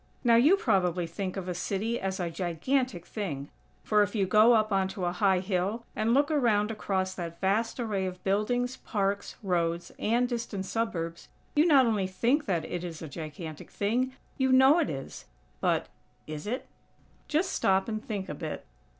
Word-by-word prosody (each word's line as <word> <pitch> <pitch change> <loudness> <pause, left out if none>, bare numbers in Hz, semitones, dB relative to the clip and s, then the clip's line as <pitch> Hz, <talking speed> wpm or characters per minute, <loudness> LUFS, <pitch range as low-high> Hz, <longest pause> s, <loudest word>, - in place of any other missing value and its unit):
Now 235 -2 +5
you 285 +11 +6
probably 180 - +1
think 185 +3 -4
of 185 -1 -4
a 180 - -1
city 210 +6 -2
as 190 0 -3
a 175 -2 -2
gigantic 180 - -1
thing; 150 -10 -4 0.3
for, 210 -1 +3
if 205 +2 0
you 200 -3 +2
go 215 +5 +6
up 215 -1 +3
onto 190 -1 0
a 175 - +1
high 185 0 +2
hill, 195 +4 -1
and 220 +1 +1
look 285 +5 +3
around 225 -7 +2
across 190 -3 -1
that 170 -2 -6
vast 210 +6 0
array 205 -5 -1
of 180 0 -7
buildings, 245 +6 0
parks, 200 -2 -2
roads 170 -2 0
and 240 +3 +2
distant 230 -5 -3
suburbs, 175 -7 -3 0.3
you 300 +3 +5
not 275 -5 +6
only 210 -5 +1
think 240 +11 +1
that 170 -5 0
it 175 0 -4
is 165 -2 -6
a - - -5
gigantic 155 +1 -7
thing, 245 +6 0 0.3
you 265 0 +3
know 265 +5 +7
it 325 - +1
is. 135 -2 -6 0.3
But, - - +1 0.4
is 155 +3 -6
it? 250 +5 -3 0.6
Just 330 +5 +1
stop 190 0 +2
and 215 -1 -3
think 200 -4 -4
a - - -4
bit. - - -6
200 Hz, 180 wpm, -29 LUFS, 180-235 Hz, 0.6 s, know